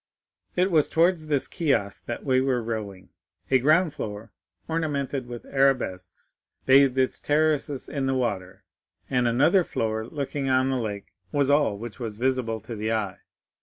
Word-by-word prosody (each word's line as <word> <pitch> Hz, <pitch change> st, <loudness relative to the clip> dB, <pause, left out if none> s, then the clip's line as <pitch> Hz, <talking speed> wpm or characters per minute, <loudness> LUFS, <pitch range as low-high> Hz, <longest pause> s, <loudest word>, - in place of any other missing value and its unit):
"It 185 Hz, +2 st, +2 dB
was 155 Hz, -3 st, +3 dB
towards 165 Hz, -1 st, +2 dB
this 145 Hz, -3 st, 0 dB
kiosk 135 Hz, -, -1 dB
that 120 Hz, -, -5 dB
we 130 Hz, -2 st, +3 dB
were 130 Hz, -3 st, 0 dB
rowing. 105 Hz, -5 st, -5 dB, 0.4 s
A 130 Hz, -, +5 dB
ground 155 Hz, +4 st, +3 dB
floor, 105 Hz, -5 st, -6 dB, 0.4 s
ornamented 145 Hz, -5 st, -2 dB
with 120 Hz, -1 st, -8 dB
arabesques, 125 Hz, -10 st, -1 dB, 0.3 s
bathing 135 Hz, -1 st, +5 dB
its 130 Hz, -, -3 dB
terraces 150 Hz, -2 st, 0 dB
in 140 Hz, -2 st, -2 dB
the 135 Hz, -, +1 dB
water, 95 Hz, -6 st, -3 dB, 0.5 s
and 125 Hz, -2 st, +2 dB
another 145 Hz, +11 st, +4 dB
floor, 110 Hz, -5 st, -2 dB
looking 140 Hz, 0 st, -3 dB
on 130 Hz, +1 st, +3 dB
the 130 Hz, -, 0 dB
lake, 105 Hz, -4 st, -5 dB, 0.2 s
was 140 Hz, -1 st, +2 dB
all 145 Hz, -8 st, +3 dB
which 115 Hz, +2 st, -8 dB
was 110 Hz, -4 st, -5 dB
visible 125 Hz, -2 st, 0 dB
to 115 Hz, +2 st, -7 dB
the 110 Hz, +1 st, -2 dB
eye. 105 Hz, -4 st, -2 dB
130 Hz, 160 wpm, -25 LUFS, 110-145 Hz, 0.5 s, A